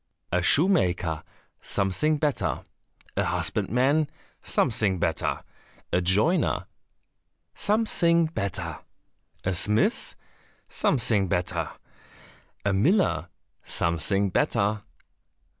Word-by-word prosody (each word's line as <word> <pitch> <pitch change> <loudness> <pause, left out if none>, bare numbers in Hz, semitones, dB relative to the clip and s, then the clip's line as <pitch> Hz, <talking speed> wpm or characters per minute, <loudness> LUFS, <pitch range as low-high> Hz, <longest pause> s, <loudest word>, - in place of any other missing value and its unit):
"A 90 - +2
shoemaker?" 90 - +2 0.4
"Something 100 +11 0
better." 150 -2 0 0.5
"A - - +2
husbandman?" 140 +6 +1 0.3
"Something 105 -6 +1
better." - - -1 0.5
"A 90 - +3
joiner?" 105 - +2 0.9
"Something 185 -6 +2
better." 95 - -3 0.6
"A 95 - 0
smith?" 105 +5 0 0.5
"Something 110 -6 +1
better." 90 0 -1 1.0
"A 100 - +2
miller?" 155 - +2 0.4
"Something 90 +4 0
better." 105 +3 +1
105 Hz, 75 wpm, -26 LUFS, 90-155 Hz, 1.0 s, A